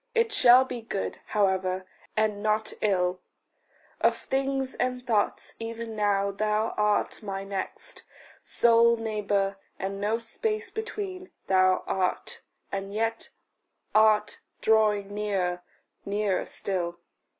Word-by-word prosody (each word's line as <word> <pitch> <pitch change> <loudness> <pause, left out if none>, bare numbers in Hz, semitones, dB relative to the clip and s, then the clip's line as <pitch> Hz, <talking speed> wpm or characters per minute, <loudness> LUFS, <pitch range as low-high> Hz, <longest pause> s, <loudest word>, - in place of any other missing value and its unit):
It 460 -1 +3
shall 255 -9 +7
be 245 -2 -5
good, 215 -3 -4
how 210 -1 +3
ever, 185 -1 -1 0.3
and 215 -1 +1
not 215 0 +1
ill; 185 -3 +1 0.8
Of - - +3
things 270 0 -1
and 250 0 -2
thoughts 215 -4 0
even 230 0 -5
now 200 -1 +1
thou 215 +2 0
art 210 0 +1
my 195 -2 -4
next; 195 -1 -5 0.4
Sole 235 0 +4
neighbour, 205 -3 -1 0.2
and 195 +1 -4
no 215 +2 +1
space 430 - -2
between, 400 -4 -5 0.2
thou 185 -1 +3
art 185 -1 -1 0.3
And 195 0 -4
yet 225 +1 -1 0.6
art 215 -1 +4 0.2
drawing 210 -2 +2
nearer, 190 -4 -1 0.4
nearer 200 -1 0
still. 175 -3 -2
210 Hz, 115 wpm, -27 LUFS, 195-230 Hz, 0.8 s, shall